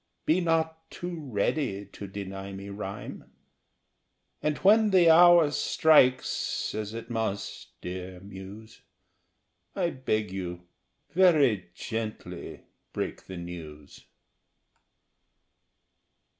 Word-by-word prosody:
Be 165 +4 +3
not 160 -1 0
too 170 -5 -6
ready 100 -1 -1
to 100 +1 -9
deny 95 0 -6
me 100 +1 -8
rhyme; 100 0 -7 1.1
And 150 -1 0
when 215 +2 +5
the 180 -4 +6
hour 170 -2 +7
strikes, 135 -5 +3
as 110 0 -4
it 115 +1 -7
must, 110 -3 -4
dear 90 0 -6
Muse, 100 +3 -11 0.9
I 175 -3 0
beg 110 -6 -1
you 90 -2 -5 0.5
very 145 - +4
gently 110 +2 -6 0.3
break - - -4
the 95 - -7
news. 80 -4 -9
110 Hz, 95 wpm, -28 LUFS, 95-160 Hz, 1.1 s, hour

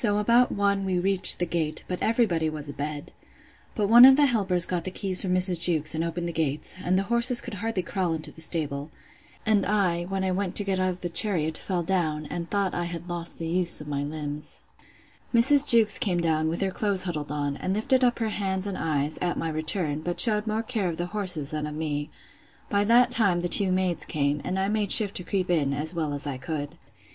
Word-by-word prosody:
So 205 -3 +1
about 235 +4 +2
one 200 -1 -1
we 190 -1 -2
reached 190 +1 +2
the 175 - -2
gate; 165 -2 -3
but 180 - -5
every 230 +2 +1
body 165 -5 -2
was 155 -1 -8
a 145 - -8
bed. 145 +1 -7 0.6
But 210 -2 -1
one 235 +3 +7
of 265 +1 +9
the 290 +1 +3
helpers 195 -9 +1
got 180 -2 -3
the 185 - -4
keys 185 0 +4
from 180 -1 -1
Mrs. 180 -2 +3
Jewkes, 160 -3 +3
and 160 +1 -2
opened 170 +1 -4
the 170 - -6
gates; 155 +1 0
and 185 +1 0
the 195 - 0
horses 235 +3 +4
could - - -4
hardly 205 -2 -4
crawl 180 -3 -3
into 155 - -7
the 160 - -13
stable. 150 -3 -2 0.6
And 215 -2 +2
I, 180 -5 -1
when 190 +1 -4
I 190 - -1
went 185 0 -3
to 205 - +8
get 195 -1 -2
out 185 0 0
of 180 0 -7
the 175 - -4
chariot, 165 -4 +1
fell 180 0 -3
down, 160 -4 -2
and 170 -1 -6
thought 200 -2 -1
I 175 - -3
had 170 0 -8
lost 175 -1 -3
the 165 - -6
use 175 +1 0
of 150 - -11
my 140 -1 -3
limbs. 150 0 -5 0.7
Mrs. 275 +5 +6
Jewkes 220 -3 +6
came 180 -4 -1
down 160 -2 -1
with 170 - -4
her 195 -1 -1
clothes 200 -1 0
huddled 150 -6 -5
on, 145 -1 -3
and 190 +1 -3
lifted 260 +4 0
up 245 -1 +1
her 225 -2 -2
hands 190 -2 -2
and 200 -2 -5
eyes, 150 -1 -2
at 175 -1 -2
my 165 - -3
return; 155 -1 -1
but 175 +2 -5
shewed 215 -2 0
more 220 +1 -2
care 220 -6 -3
of 165 - -6
the 175 - -3
horses 180 -9 +1
than 150 -1 -4
of 150 - -8
me. 150 -2 -4 0.6
By 205 0 +1
that 240 +3 +3
time 200 -8 +2
the 175 - -2
two 195 0 +1
maids 185 -2 -1
came; 145 -1 -2
and 185 - -4
I 190 +1 -1
made 210 -1 -1
shift 205 -2 +8
to 180 - -6
creep 185 -1 -3
in, 140 -5 0
as 155 +4 -1
well 160 -3 -3
as 145 0 -3
I 135 -3 -5
could. 145 +3 -6
180 Hz, 240 wpm, -25 LUFS, 155-200 Hz, 0.7 s, of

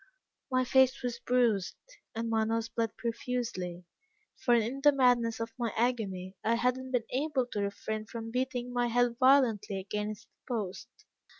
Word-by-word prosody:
My 255 -1 +2
face 265 +1 +4
was 240 -1 -2
bruised, 235 -7 +1 0.4
and 230 +1 -2
my 225 -1 +2
nose 225 +1 -1
bled 230 -1 -2
profusely, 230 -7 -3 0.5
for 240 - +2
in 235 +4 0
the 290 +1 +7
madness 245 -4 +3
of 230 0 -4
my 235 -2 0
agony, 200 -6 -1
I 230 +1 +2
had 250 +2 +2
not 260 0 -7
been 250 -3 +1
able 270 -1 0
to 205 - -1
refrain 215 +2 -3
from 225 +1 -6
beating 250 0 -2
my 245 0 +1
head 240 0 +2
violently 240 -7 +4
against 210 +2 -4
the 250 - -9
post. 195 -4 -4
235 Hz, 165 wpm, -31 LUFS, 220-250 Hz, 0.5 s, the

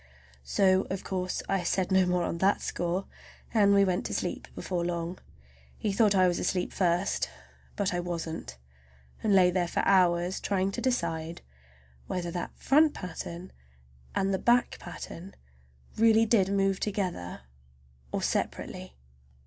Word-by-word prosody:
So 190 - +3
of 190 0 -3
course 185 -1 -3
I 195 -1 +1
said 190 +1 0
no 190 -1 +4
more 180 -1 +1
on 170 - -3
that 195 +3 +3
score, 175 +3 -2 0.5
and 205 -3 +5
we 200 0 +5
went 180 -1 0
to - - -4
sleep - - -3
before 175 -2 -2
long. 170 +1 -3 0.6
He 205 - -1
thought 205 0 +4
I 185 -1 +5
was 175 - 0
asleep 180 -1 -1
first, 180 +1 +1 0.5
but 200 -3 0
I 175 - 0
wasn't,—I 65 - -7
lay 190 -3 +5
there 175 -1 0
for - - 0
hours 180 -1 +3
trying 195 -1 0
to - - -4
decide 165 -10 -2 0.6
whether 175 -1 -3
that 175 0 -5
front 300 +2 +4
pattern 180 0 -7 0.6
and 195 0 +1
the 190 - 0
back 240 +1 +2
pattern 185 +4 -9 0.6
really 225 0 +5
did 200 -4 +3
move 195 -1 +1
together 185 - -3 0.7
or - - -2
separately. 65 - -3
185 Hz, 145 wpm, -29 LUFS, 175-195 Hz, 0.7 s, and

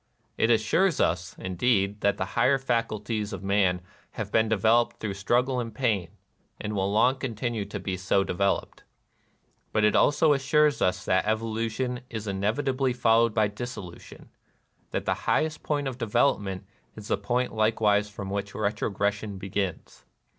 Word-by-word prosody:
It 115 - +2
as 110 -2 +4
sures 175 - +2
us, 85 +2 0
indeed, 100 +2 0
that 100 - +2
the - - -1
higher 125 +4 +3
faculties 115 -4 -2
of 95 -1 -6
man 95 -2 +2 0.3
have - - -5
been 110 0 +3
developed 110 +2 +3
through 105 -3 -3
struggle 125 +6 +1
and 115 -3 -5
pain, 105 -10 0 0.5
and 105 - -4
will 100 -1 0
long 125 +5 +3
continue 115 -3 -3
to 100 0 -6
be 95 -1 -3
so 95 +2 +1
de - - -3
veloped; 100 +2 -1 0.9
but 110 - +1
it 105 - +4
also 150 +1 +4
assures 145 0 +2
us 90 0 +1
that 95 +3 +1
evolution 115 +3 -1
is 110 -2 -5
inevitably 125 +7 0
followed 115 -2 +3
by 110 -2 +3
dissolution, 105 -4 -9 0.3
— - - -42
that - - -3
the - - +2 0.2
highest 155 -1 +1
point 145 -2 -1
of 130 -1 -5
development 105 -5 0 0.3
is 105 -1 -10
the - - +3
point 125 +1 -1
likewise 110 -1 +2
from 100 -2 -7
which 100 0 -4
retrogression 105 -1 -1
begins. 95 -2 -4
110 Hz, 160 wpm, -27 LUFS, 100-120 Hz, 0.9 s, as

